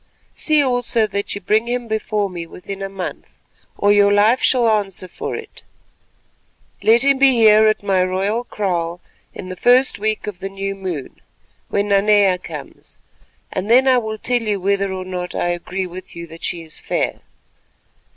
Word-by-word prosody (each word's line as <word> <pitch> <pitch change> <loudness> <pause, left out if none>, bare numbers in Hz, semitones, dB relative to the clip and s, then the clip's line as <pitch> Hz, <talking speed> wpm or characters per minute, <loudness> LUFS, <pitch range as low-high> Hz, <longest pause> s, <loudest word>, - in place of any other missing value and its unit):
See 305 -2 +2
also 245 -3 +1
that 200 -1 -3
you 200 - -6
bring 215 +4 +1
him 245 0 -2
before 215 -1 -1
me 175 -3 -7
within 195 +3 -8
a 195 - -3
month, 195 -2 -7 0.4
or 205 - +3
your 205 0 +5
life 210 +5 +4
shall 245 -3 +3
answer 200 -4 -1
for - - -5
it. 450 -1 -8 1.2
Let 230 +3 +4
him 275 -1 +3
be 270 -1 +6
here 220 -2 +6
at 215 -1 +1
my 190 -2 +2
royal 195 +5 -1
kraal 175 -6 -2 0.4
in 185 - -8
the 185 - -5
first 250 +6 +3
week 215 +1 -1
of 205 -4 -6
the 195 - -5
new 195 0 -4
moon—when 195 +3 -6
Nanea 200 -2 +4
comes—and 185 +2 -10
then 255 +3 +5
I 255 -1 +5
will 220 -2 -5
tell 245 +2 0
you 210 -3 -1
whether 200 +1 0
or 185 -1 -5
no 180 -1 -4
I 175 - 0
agree 180 +2 -3
with 185 +1 -10
you 170 0 -7
that 165 0 -13
she 170 -2 -3
is 160 -1 -8
fair. - - -2
200 Hz, 170 wpm, -19 LUFS, 185-225 Hz, 1.2 s, be